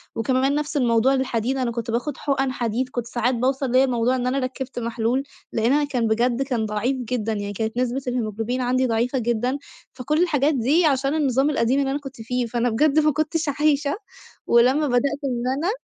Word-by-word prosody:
وكمان 260 +4 +1
نفس 295 0 -2
الموضوع 240 0 +3
للحديد، 260 -1 -1
أنا 250 -3 -1
كنت 235 0 -4
باخد 255 +5 -2
حُقن 270 -2 0
حديد 245 +1 -2
كنت 240 -2 -4
ساعات 240 +1 0
باوصل 260 +2 0
ليّا 260 +2 +5
موضوع 245 0 +1
إن 250 -1 -1
أنا 270 +2 0
ركِّبت 255 0 -4
محلول، 235 +3 -1 0.3
لإن 230 +4 +2
أنا 295 - +3
كان 250 -5 -1
بجد 235 +3 +1
كان 245 -5 -1
ضعيف 215 +6 -1
جدًا، 240 -3 -2
يعني 205 -1 -4
كانت 220 +3 -3
نسبة 255 +2 0
الهيموجلوبين 235 0 -2
عندي 255 +1 +1
ضعيفة 240 +3 0
جدًا. 240 +3 0 0.4
فكل 300 +5 -1
الحاجات 295 -3 +2
دي 280 +8 +2
عشان 275 -1 +2
النظام 275 -2 +2
القديم 265 -1 +1
اللي 270 -1 0
أنا 280 - -1
كنت 270 -4 -10
فيه، 250 +2 -1
فأنا 240 +1 0
بجد 295 +6 +3
ما 305 0 +3
كنتش 310 +2 -1
عايشة، 290 0 +2 0.5
ولمَّا 260 +6 +4
بدأت 275 +3 +1
إن 245 -3 -2
أنا 340 +7 0
255 Hz, 195 wpm, -23 LUFS, 235-275 Hz, 0.5 s, ليّا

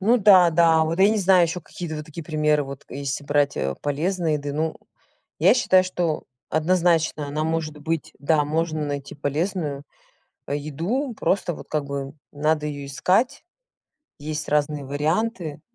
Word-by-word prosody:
Ну 225 +6 +4
да, 185 -5 +7
да. 165 -1 +4
Вот 165 +2 -2
я 195 - +7
не 215 0 +2
знаю 190 -2 +5
ещё 170 +2 -3
какие-то 160 0 -7
вот 150 - -6
такие 155 +1 -8
примеры, 150 -2 +1
вот 135 0 -9
если 140 +1 -4
брать, 145 0 +1
э, 65 0 -1
полезной 160 +3 0
еды. 145 -1 -3
Ну, 155 +2 -1 0.6
я - - +6
считаю, 185 -7 +4
что 175 -3 -2 0.3
однозначно, 160 -2 +1
она 150 +2 -2
может 160 -1 -2
быть, 160 +1 -3
да, 150 +1 +2
можно 155 0 -1
найти 140 -1 -5
полезную, 150 0 -2 0.6
а, - - -4
еду, 170 - -2
просто 185 -2 0
вот - - -11
как 150 -2 -2
бы 140 0 -5 0.2
надо 150 +1 0
её 145 -1 -5
искать. 185 - +1 0.8
Есть 150 +1 -5
разные 150 -1 0
варианты. 155 - -1
155 Hz, 160 wpm, -23 LUFS, 145-175 Hz, 0.8 s, да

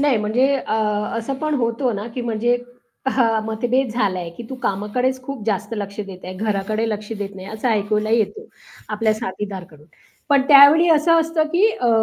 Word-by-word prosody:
नाही 285 -4 +3
म्हणजे 245 +6 +2
अ, 255 - -3 0.4
असं 230 +4 -3
पण 305 -1 0
होतं 235 -1 0
ना, 205 - -5
की 255 - -3
म्हणजे 235 +1 +1 0.5
हां. 230 -4 +2
मतभेद 245 +4 0
झाला 200 -6 0
आहे, 170 -1 -5
की 170 - -10
तू - - -4
कामाकडेच 250 +6 -1
खूप 260 -4 -7
जास्त 210 +1 -2
लक्ष 200 0 -5
देत 195 -3 -9
आहे, 185 - -6
घराकडे 215 +2 -1
लक्ष 210 +1 -5
देत 200 -1 -5
नाही 190 0 -9
असं 220 +3 -3
ऐकायला 215 0 0
येतो, 230 - 0 0.4
आपल्या 215 +1 +1
साथीदार 195 -3 -5
कडून. 150 -1 -18 0.4
पण 280 -2 +4
त्यावेळी 290 +4 +8
असं 330 +1 +4
असतं, 325 0 0
की 380 +5 +5
अ, 245 - -1
225 Hz, 185 wpm, -21 LUFS, 205-265 Hz, 0.5 s, त्यावेळी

